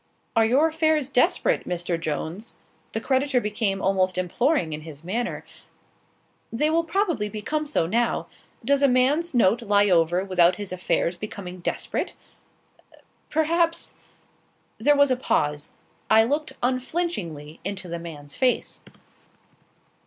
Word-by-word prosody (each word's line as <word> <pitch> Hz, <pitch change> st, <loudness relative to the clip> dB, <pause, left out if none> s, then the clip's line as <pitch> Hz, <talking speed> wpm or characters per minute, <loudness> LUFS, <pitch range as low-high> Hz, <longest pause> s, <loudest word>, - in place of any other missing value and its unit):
"Are 225 Hz, -, +5 dB
your 270 Hz, +8 st, +4 dB
affairs 315 Hz, -3 st, +1 dB
desperate, 310 Hz, +7 st, +2 dB
Mr. 175 Hz, -1 st, -2 dB
Jones?" 165 Hz, +7 st, -4 dB, 0.4 s
The 225 Hz, -, -1 dB
creditor 265 Hz, +2 st, +1 dB
became 210 Hz, -3 st, -1 dB
almost 185 Hz, -1 st, +1 dB
imploring 185 Hz, -, +1 dB
in 150 Hz, -, -5 dB
his 155 Hz, -1 st, -11 dB
manner. 225 Hz, +8 st, -3 dB, 1.1 s
"They 300 Hz, +7 st, +1 dB
will 335 Hz, +1 st, +2 dB
probably 335 Hz, -, 0 dB
become 295 Hz, +9 st, -3 dB
so 285 Hz, -, +1 dB
now. 230 Hz, +7 st, 0 dB, 0.4 s
Does 280 Hz, +2 st, +3 dB
a 280 Hz, -, +6 dB
man's 275 Hz, +6 st, +2 dB
note 230 Hz, 0 st, +4 dB
lie 205 Hz, -2 st, +3 dB
over 175 Hz, +2 st, +3 dB
without 180 Hz, -2 st, +4 dB
his 200 Hz, -1 st, -6 dB
affairs 180 Hz, -1 st, 0 dB
becoming 185 Hz, -2 st, -7 dB
desperate?" 175 Hz, -, -3 dB, 1.1 s
"Perhaps" 335 Hz, +2 st, +1 dB, 0.9 s
There 290 Hz, +6 st, +4 dB
was 285 Hz, -1 st, +5 dB
a -, -, +4 dB
pause. 150 Hz, -, -1 dB, 0.4 s
I 220 Hz, 0 st, +6 dB
looked 290 Hz, +6 st, -1 dB
unflinchingly 245 Hz, -, -2 dB
into 190 Hz, -1 st, -5 dB
the 170 Hz, 0 st, -4 dB
man's 150 Hz, -4 st, -9 dB
face. 255 Hz, -1 st, 0 dB
220 Hz, 130 wpm, -24 LUFS, 180-285 Hz, 1.1 s, a